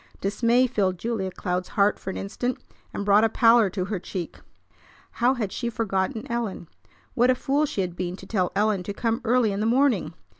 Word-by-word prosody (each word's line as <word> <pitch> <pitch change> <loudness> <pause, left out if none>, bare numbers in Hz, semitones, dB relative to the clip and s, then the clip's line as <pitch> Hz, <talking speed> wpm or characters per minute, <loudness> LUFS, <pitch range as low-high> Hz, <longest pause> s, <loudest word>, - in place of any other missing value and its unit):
Dismay 230 +5 +2
filled 195 -7 0
Julia 220 -1 -2
Cloud's 180 0 -3
heart 200 0 +2
for - - -6
an - - -4
instant, 245 +5 -3 0.3
and 200 - -4
brought 205 +1 +5
a 225 - +4
pallor 230 -2 +5
to 185 -1 -3
her 200 -1 -3
cheek. 175 -1 -6 0.7
How 250 +2 +2
had 215 -6 -3
she 235 +3 -3
forgotten 220 0 -2
Ellen? 230 -7 -3 0.5
What 245 +1 +3
a 255 - +4
fool 285 +3 0
she 200 - -2
had 180 -2 -3
been 180 0 -3
to 190 - -12
tell 185 -3 0
Ellen 210 -1 +2
to 200 +3 -6
come 230 +2 -1
early 240 -2 +2
in 200 - -3
the 215 - 0
morning! 235 - +2
210 Hz, 200 wpm, -25 LUFS, 190-235 Hz, 0.7 s, brought